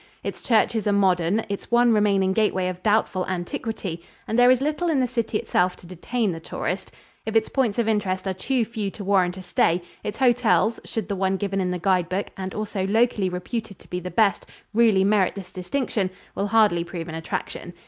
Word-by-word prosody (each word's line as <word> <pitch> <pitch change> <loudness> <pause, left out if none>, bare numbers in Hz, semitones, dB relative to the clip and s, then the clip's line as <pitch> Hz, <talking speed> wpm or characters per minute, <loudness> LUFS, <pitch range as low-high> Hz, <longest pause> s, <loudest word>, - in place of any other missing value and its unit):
Its - - -5
churches 220 -2 +2
are - - +3
modern, 190 +1 +2
its 200 -1 -5
one 240 0 +4
remaining 200 -3 +3
gateway 190 -3 +1
of 180 0 -5
doubtful 205 -2 +1
antiquity, 185 -1 -4 0.3
and 225 - +1
there 245 0 +7
is 255 -1 +5
little 305 +5 -1
in 300 -4 +2
the 255 - +2
city 230 -3 -1
itself 180 -2 +1
to - - -17
detain 200 +5 -2
the 165 - -5
tourist. 180 +3 -4 0.3
If 220 0 -4
its 220 -1 +3
points 250 -7 0
of 235 -2 +1
interest 195 -3 0
are 190 - 0
too 245 +5 0
few 215 -3 -3
to 200 - -8
warrant 190 -2 +2
a 190 - -8
stay, 180 -1 +2 0.2
its 210 - -4
hotels 240 -3 +3
should 220 -3 -4
the 200 - -2
one 190 0 0
given 195 -1 -1
in 180 - 0
the 180 - -1
guide 180 -1 +1
book 190 +3 -2
and 190 -1 -5
also 205 -3 -2
locally 220 -2 +2
reputed 195 +3 -5
to - - -18
be 180 - -3
the 180 0 -6
best, 210 -1 +2 0.3
really 220 -4 +4
merit 200 -1 +2
this 195 -2 -8
distinction 190 +1 -2 0.2
will 200 - -1
hardly 205 -5 +3
prove 170 -1 -6
an 160 - -7
attraction. 160 0 -5
200 Hz, 210 wpm, -24 LUFS, 185-225 Hz, 0.3 s, there